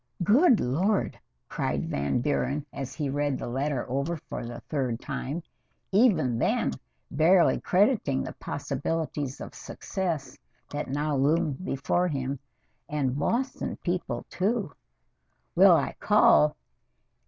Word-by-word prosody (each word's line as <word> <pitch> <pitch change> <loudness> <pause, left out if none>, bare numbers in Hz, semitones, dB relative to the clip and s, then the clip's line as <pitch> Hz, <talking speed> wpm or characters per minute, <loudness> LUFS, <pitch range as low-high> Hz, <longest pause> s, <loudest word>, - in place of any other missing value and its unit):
"Good 245 - +5
Lord!" 185 - 0 0.3
cried - - -2
Van 70 +10 0
Buren 145 +1 -1
as 135 -1 -5
he 150 -3 -2
read 145 0 0
the - - -5
letter 135 +1 -2
over 140 +6 -1
for 135 - -7
the 120 0 -6
third 130 -6 -2
time, 150 +7 -4 0.5
even 180 - +3
then - - +1 0.4
barely 170 +4 +4
crediting 190 - +2
the - - -6
possibilities 145 0 -3
of - - -8
success 170 -8 -4 0.3
that 145 -1 -4
now 145 +2 -1
loomed 145 +3 +1
before 175 +2 0
him. 135 -3 -3 0.5
"And 140 -3 -1
Boston 255 - -1
people, 180 0 -2
too! 200 -2 0 0.8
Will - - +7
I - - 0
call! 75 0 +5
145 Hz, 120 wpm, -27 LUFS, 135-180 Hz, 0.8 s, Will